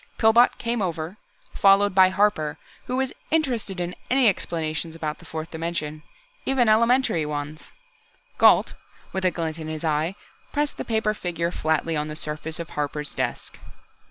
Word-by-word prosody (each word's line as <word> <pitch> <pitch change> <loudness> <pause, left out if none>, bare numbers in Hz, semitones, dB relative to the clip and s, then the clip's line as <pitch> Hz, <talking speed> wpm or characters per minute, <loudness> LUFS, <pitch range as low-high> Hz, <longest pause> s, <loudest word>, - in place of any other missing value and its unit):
Pillbot 230 +2 +5
came 235 -1 -1
over, 170 0 -3 0.4
followed 200 0 +5
by 185 0 +6
Harper, 185 -6 +1 0.3
who 250 - -2
was 265 0 -1 0.2
interested 245 - 0
in 175 0 -2 0.2
any 255 -1 +5
explanations 165 -4 -1
about 155 -2 -4
the - - -15
fourth 160 0 -6
dimension 160 -2 -4 0.4
even 265 -3 +2
elementary 230 -5 +3
ones.... 150 +1 -5 0.7
Gault, - - +6 0.4
with 190 0 -2
a - - +5
glint 165 -2 -4
in 155 - -6
his 155 +1 -4
eye, 155 +4 0 0.4
pressed 295 0 -1
the - - -4
paper 220 -2 +1
figure 170 -4 -2
flatly 160 0 0
on 150 0 -1
the 150 - -6
surface 155 +1 -5
of 170 - -6
Harper's 150 0 -3
desk. - - -4
170 Hz, 155 wpm, -24 LUFS, 155-215 Hz, 0.7 s, by